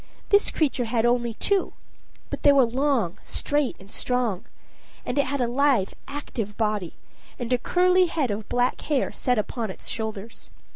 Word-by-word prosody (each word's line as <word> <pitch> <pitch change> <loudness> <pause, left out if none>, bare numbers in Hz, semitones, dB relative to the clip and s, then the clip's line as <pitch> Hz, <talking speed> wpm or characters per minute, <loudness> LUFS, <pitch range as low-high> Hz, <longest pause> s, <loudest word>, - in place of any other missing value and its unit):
This 405 0 +4
creature 270 -6 0
had 230 0 +1
only 240 -1 +1
two; 395 - +1 0.6
but - - -4
they 285 - +7
were 275 -3 +6
long, 240 - 0
straight, 290 -3 -1
and 195 +1 -15
strong. 245 -7 -1 0.6
And - - -1
it 280 - +2
had 280 0 -1
a 245 - +2
lithe, 255 -5 +2 0.2
active 235 -7 -5
body, 210 -6 -1 0.4
and 245 0 -2
a 250 - +2
curly 365 +5 +4
head 300 -8 -1
of 210 +1 -5
black 245 +1 +1
hair 290 -3 0
set 250 -2 0
upon 220 +1 -2
its 190 - -9
shoulders. 220 0 -5
245 Hz, 165 wpm, -25 LUFS, 220-285 Hz, 0.6 s, they